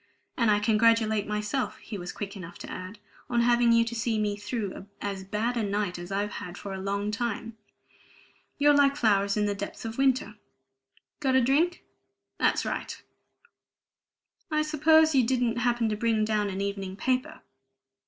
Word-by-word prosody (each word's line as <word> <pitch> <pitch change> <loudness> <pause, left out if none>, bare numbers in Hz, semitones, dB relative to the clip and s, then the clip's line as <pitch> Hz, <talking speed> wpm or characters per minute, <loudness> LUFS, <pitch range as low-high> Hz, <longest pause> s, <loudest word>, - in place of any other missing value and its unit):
And 230 -3 +2
I 210 - +5
congratulate 220 0 +3
myself," 210 +5 -2
he 220 - -9
was 175 -3 -5
quick 200 -1 -6
enough 175 -3 -9
to - - -9
add, 185 +4 -7 0.3
"on 240 -1 +2
having 240 0 +4
you 230 0 +5
to 230 - -5
see 230 -1 -1
me 210 -1 0
through 205 -2 -5
as 200 -2 -4
bad 215 +5 -2
a 235 - 0
night 200 -3 -1
as 175 +2 -8
I've 205 +1 -1
had 180 -2 -7
for 200 - -6
a 190 - -5
long 200 +2 -2
time. 225 0 -3 1.0
You're 290 0 +5
like 280 -1 +4
flowers 200 -6 +2
in 210 - +2
the 205 - 0
depths 200 +2 -6
of 225 +3 -5
winter. 260 -6 +1 0.8
Got 265 -3 +1
a 260 - +5
drink? 310 +8 +2 0.6
That's - - +2
right! - - -4 1.5
I 305 -1 +1
suppose 315 +1 +4
you 265 -2 +5
didn't 240 -1 +1
happen 240 -1 +1
to 210 - -1
bring 220 0 +1
down 210 -1 0
an 190 0 -4
evening 195 -1 -3
paper?" 260 +8 -1
220 Hz, 175 wpm, -27 LUFS, 200-245 Hz, 1.5 s, I